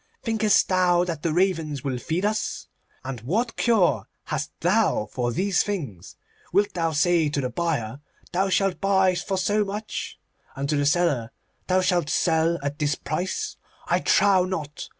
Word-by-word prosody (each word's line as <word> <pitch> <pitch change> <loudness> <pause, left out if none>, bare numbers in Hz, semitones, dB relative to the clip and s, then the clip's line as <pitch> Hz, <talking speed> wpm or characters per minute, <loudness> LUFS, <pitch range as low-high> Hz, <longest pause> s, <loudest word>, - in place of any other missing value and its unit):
Thinkest 220 -3 +3
thou 180 -2 +3
that 170 -4 -4
the 165 - 0
ravens 160 -5 0
will 130 -3 -2
feed 170 +9 -2
us? 215 +1 -2 0.4
And 130 -3 -5
what 220 - -1
cure 225 -7 +2 0.2
hast - - -3
thou 105 - +2
for 120 -1 -1
these 190 +8 +1
things? 140 - -5 0.4
Wilt 200 +3 +2
thou 165 -2 0
say 160 +1 +2
to 145 - -2
the 125 -2 -2
buyer, 140 -4 -2 0.3
"Thou 190 +2 +1
shalt 195 -1 +1
buy 190 -1 +3
for 190 +2 -2
so 205 +3 +1
much," 205 +2 -5 0.4
and 140 +1 -3
to 150 - +2
the 145 -1 +1
seller, 145 -8 +1 0.4
"Thou 185 0 +3
shalt 175 -5 +1
sell 165 0 +2
at 140 +1 -3
this 150 0 +1
price"? 180 +4 -3 0.3
I - - +1
trow 195 -3 +4
not. 155 -6 -5
175 Hz, 165 wpm, -24 LUFS, 145-190 Hz, 0.4 s, trow